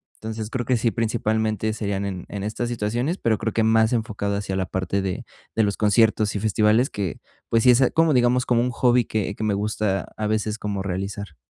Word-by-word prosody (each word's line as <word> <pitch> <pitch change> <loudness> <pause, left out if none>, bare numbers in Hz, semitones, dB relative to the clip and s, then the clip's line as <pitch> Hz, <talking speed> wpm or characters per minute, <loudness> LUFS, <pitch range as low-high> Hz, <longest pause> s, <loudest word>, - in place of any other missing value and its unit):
Entonces, 110 0 -6
creo 125 -1 -3
que 125 -1 +2
sí, 115 0 +1
principalmente, 110 -1 0
serían 100 -2 -2
en 95 -3 -5
en 100 -1 -5
estas 115 +3 -3
situaciones, 120 - -1
pero 110 -2 +1
creo 110 -1 -3
que 110 - +2
más 110 +1 +4
enfocado 100 -3 -1
hacia 100 -2 -3
la 95 - 0
parte 95 +2 -1
de 95 -2 -3 0.3
de 110 - +3
los 100 -1 0
conciertos 105 0 +3
y - - 0
festivales 110 +5 +2
que, 100 -4 -4 0.3
pues, 115 -1 +2
sí 125 - +7
es 125 +2 +4
como, 165 -2 +4
digamos, 125 0 +3
como 120 -1 +2
un 125 0 0
hobby 120 0 +3
que 105 -1 -2
que 110 - -5
me 105 - +1
gusta 105 -2 -1
a 105 -1 -1
veces 110 0 -1
como 100 -2 -3
realizar. 95 -2 -4
110 Hz, 215 wpm, -23 LUFS, 100-115 Hz, 0.3 s, sí